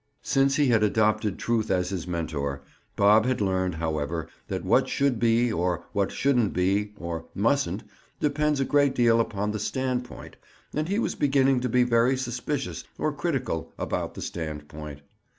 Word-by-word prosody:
Since 135 0 +2
he 145 -3 +3
had 115 -3 +4
adopted 105 -1 +2
truth 115 -2 0
as 90 -1 +1
his 90 -3 -4
mentor, 70 -5 -3 0.3
Bob 105 +3 +5
had 130 - 0
learned, 95 -3 0
however, 80 0 -2 0.2
that - - -4
"what - - +3
should 140 -5 +1
be" 115 0 +3
or 90 -1 -1
"what 100 -2 0
shouldn't," 125 -9 +1 0.4
or 85 -2 -5
"mustn't," 110 -2 +1 0.4
depends 150 0 +1
a 135 - +1
great 145 0 +3
deal 115 -1 +4
upon 105 -2 -2
the 110 - -3
standpoint, 125 +2 -3 0.4
and 155 +3 -1
he 200 - 0
was 235 - 0
beginning 135 -2 +3
to 125 0 -2
be 125 +2 +4
very 125 +2 +3
suspicious, 130 +3 -3
or 155 - -1
critical, 135 - -2
about - - -3
the - - -6
standpoint. 75 -2 -6
110 Hz, 160 wpm, -26 LUFS, 90-130 Hz, 0.4 s, Bob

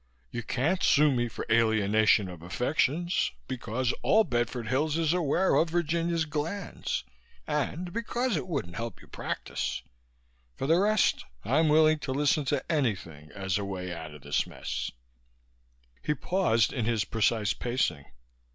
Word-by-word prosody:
You 120 - -3
can't 145 +11 0
sue 150 0 +5
me 120 -2 +1
for 115 - -6
alienation 110 -2 +4
of 90 -3 -9
affections, 145 - 0 0.2
because 125 0 -1
all 220 +2 +5
Bedford 120 - -1
Hills 145 +6 +1
is 165 -1 +2
aware 180 +2 +2
of 165 - +3
Virginia's 170 0 0
glands 160 +6 -3 0.4
and 155 +4 -2
because 240 0 -1
it 170 - -2
wouldn't 140 - -3
help 115 -4 -5
your - - -17
practice. 65 +1 -3 0.7
For - - -3
the 165 +5 +4
rest, 210 +1 +3 0.2
I'm 155 +7 +3
willing 155 0 +5
to 135 -1 -3
listen 145 +1 +2
to 135 0 0
anything 95 - -2
as 95 -1 -1
a - - -3
way 90 -2 -4
out 80 -3 -8
of 75 - -14
this 70 - 0
mess." - - -4 1.1
He 150 - 0
paused 145 - +2
in 120 -4 -1
his 110 -3 +1
precise 110 0 +1
pacing. 115 - -1
130 Hz, 150 wpm, -29 LUFS, 110-160 Hz, 1.1 s, sue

